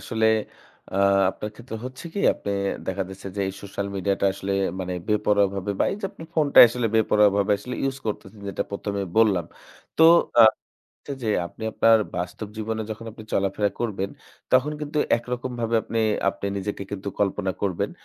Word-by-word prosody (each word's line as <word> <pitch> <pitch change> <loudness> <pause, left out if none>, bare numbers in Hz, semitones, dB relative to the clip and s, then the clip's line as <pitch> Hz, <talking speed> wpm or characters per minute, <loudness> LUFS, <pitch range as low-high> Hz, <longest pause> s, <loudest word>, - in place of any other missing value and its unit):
আসলে 110 0 0 0.7
আ 95 - -3 0.3
আপনার 105 +2 -6
ক্ষেত্রে 115 0 -8
হচ্ছে 130 +4 -8
কি 200 - -1
আপনি 100 - -5 0.4
দেখা 95 +1 -1
যাচ্ছে 95 0 -10
যে - - -1
এই - - -4
social 100 0 -4
media 100 0 0
টা - - +1
আসলে 100 0 -4 0.3
মানে 90 0 -3 0.2
বেপরোয়াভাবে 100 -2 +1
বা - - +5
এই 195 - -4
যে 195 - -1
আপনি 165 - -11
phone 155 -3 +2
টা - - +7
আসলে 120 0 -1
বেপরোয়াভাবে 105 -2 +3
আসলে 125 +4 -6
use 135 0 -5
করতেছেন 105 0 -5
যেটা 95 - -2
প্রথমে 100 0 -3 0.2
বললাম। 105 -6 +4 0.5
তো 160 - +7 0.4
আ - - +10 0.8
যে 110 - 0 0.2
আপনি 110 - -13
আপনার 115 -1 +5 0.2
বাস্তব 90 +4 -4
জীবনে 110 0 -3
যখন 110 +1 -6
আপনি 110 -1 -11
চলাফেরা 100 +1 +1
করবেন 100 -4 -2 0.4
তখন 130 +4 +4
কিন্তু 150 0 -3 0.2
একরকমভাবে 120 -1 -3
আপনি, 115 - -2 0.3
আপনি 100 0 -3
নিজেকে 100 0 -4
কিন্তু 100 0 -5
কল্পনা 95 -1 0
করবেন 95 -4 -1
105 Hz, 170 wpm, -24 LUFS, 100-115 Hz, 0.8 s, আ